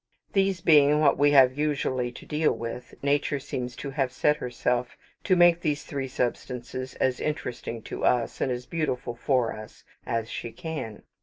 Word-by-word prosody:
These 195 -2 +2
being 150 -2 +5
what 150 -2 +4
we 145 0 +5
have 130 -3 +6
usually 130 -4 0
to - - -11
deal 150 +1 +1
with, 120 +1 -6
Nature 140 0 +1
seems 125 -3 -5
to 140 - -6
have 135 -3 0
set 150 +3 +2
herself 125 0 -2 0.3
to 185 - +4
make 175 -1 +5
these 150 -3 -1
three 135 -2 -4
substances 125 0 -3
as 130 -2 0
interesting 120 -6 -4
to - - -6
us, 120 -2 +1
and 130 - +1
as 125 0 -4
beautiful 130 -6 -2
for 125 -1 +1
us, 110 0 -11 0.2
as 115 -1 -1
she 115 - -5
can. 160 - -6
130 Hz, 170 wpm, -27 LUFS, 125-150 Hz, 0.3 s, have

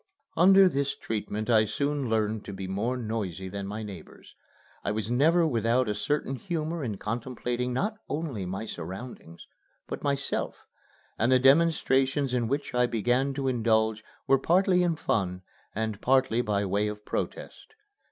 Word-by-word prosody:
Under 190 +3 +7
this 140 -4 0
treatment 110 -1 -4
I 110 -2 +5
soon 140 +4 -1
learned 110 -1 0
to 100 - -6
be 95 0 -6
more 110 +7 -1
noisy 105 -6 -4
than 100 0 -5
my 105 +2 -5
neighbors. 95 -6 -11 0.5
I - - -1
was 110 +2 -2
never 165 +7 +4
without 120 -2 +1
a 105 - 0
certain 135 +3 -1
humor 165 -1 -3
in 110 -6 -3
contemplating 120 +2 -3
not 210 - -1
only 140 - -3
my 95 +4 -4
surroundings, 90 -1 -8 0.4
but - - -5
myself; 140 -1 -2 0.5
and 115 +4 +2
the 130 - +7
demonstrations 135 -1 +3
in 120 -2 +1
which 140 +4 -2
I 125 0 +3
began 125 +4 0
to 135 -1 -2
indulge 110 -3 +1 0.2
were 135 - +4
partly 180 +3 +3
in 175 -2 +1
fun 90 -10 -1 0.3
and 110 -1 -2
partly 130 -2 +3
by 105 -3 0
way 100 +2 0
of 105 0 -6
protest. 440 - -5
120 Hz, 155 wpm, -28 LUFS, 105-140 Hz, 0.5 s, Under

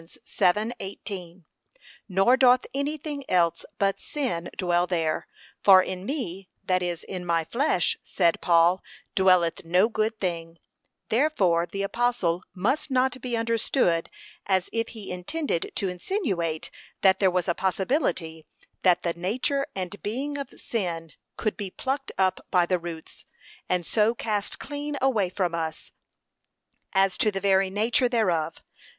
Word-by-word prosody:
7:18) 190 0 -3 0.7
nor 195 +7 +4
doth 255 -1 +5
any 280 +3 -1
thing 290 -1 -5
else 170 -2 +2
but 195 -1 +1
sin 245 - -3
dwell 175 -1 +2
there: 165 -4 -1 0.3
'for 190 -2 +8
in 185 +1 -5
me, 195 - -4
that 185 -1 +1
is, 175 -2 -3
in 185 -2 -6
my 170 -2 +1
flesh, 275 - +1
said 170 -3 +1
Paul, 175 +2 +4 0.3
'dwelleth 185 -3 +3
no 180 +6 +3
good 220 0 -1
thing:' 170 -3 -3 0.5
therefore 200 - +2
the 195 +2 -3
apostle 200 -5 0
must 245 +12 0
not 260 0 +1
be 245 -2 -2
understood 230 -6 +1 0.4
as 190 -2 +1
if 230 0 0
he 215 -5 -8
intended 180 - -2
to 195 - 0
insinuate 180 - -2 0.3
that 190 -1 +5
there 190 - +4
was 180 -1 0
a 175 - +2
possibility 185 - -1 0.3
that 180 -2 +4
the 170 - 0
nature 245 +11 -1
and 190 +1 -5
being 270 +7 -3
of 280 -1 -6
sin 170 -7 -3 0.3
could 215 - -1
be 200 -3 -5
plucked 270 +7 -3
up 190 -1 +1
by 180 -2 +4
the 180 0 +1
roots, 165 -1 -9 0.4
and 180 -1 0
so 220 +6 +2
cast 210 -3 -2
clean 290 0 -5
away 225 -8 +2
from 180 -2 -1
us, 160 -2 -4 1.0
as 195 -1 +2
to 225 - +4
the 195 -2 -3
very 195 -1 +3
nature 235 +6 +2
thereof. 175 -9 0
190 Hz, 145 wpm, -26 LUFS, 175-235 Hz, 1.0 s, for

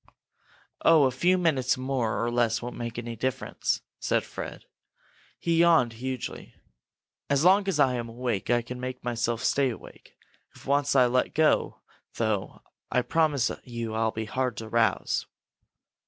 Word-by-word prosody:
"Oh, 160 -3 +6
a 130 - +3
few 175 +9 +2
minutes 140 -8 +1
more 130 -4 -1
or 120 - -1
less 120 -1 +1
won't 120 +1 -6
make 120 -1 -5
any 120 -1 -5
difference!" 130 +3 -2 0.2
said - - +1
Fred. - - -8 0.7
He 165 -1 0
yawned 165 -9 +4
hugely. 130 +1 -6 0.7
"As 140 +1 +2
long 195 +2 +5
as 180 -6 0
I'm 125 -4 +2
awake, 115 -4 -3
I 120 -1 +3
can 125 +1 -7
make 130 0 -6
myself 120 -1 -1
stay 140 -2 +2
awake. 115 - -11 0.4
If - - -15
I - - -8
once 145 0 +2
let 125 -1 +3
go, 155 0 +2 0.3
though, 110 -4 -2 0.3
I 125 - +2
promise 150 -7 +1
you 115 -2 -5
I'll 110 0 +1
be 110 0 -4
hard 125 +1 -2
to 115 - -6
rouse!" 115 0 +1
125 Hz, 155 wpm, -27 LUFS, 115-140 Hz, 0.7 s, Oh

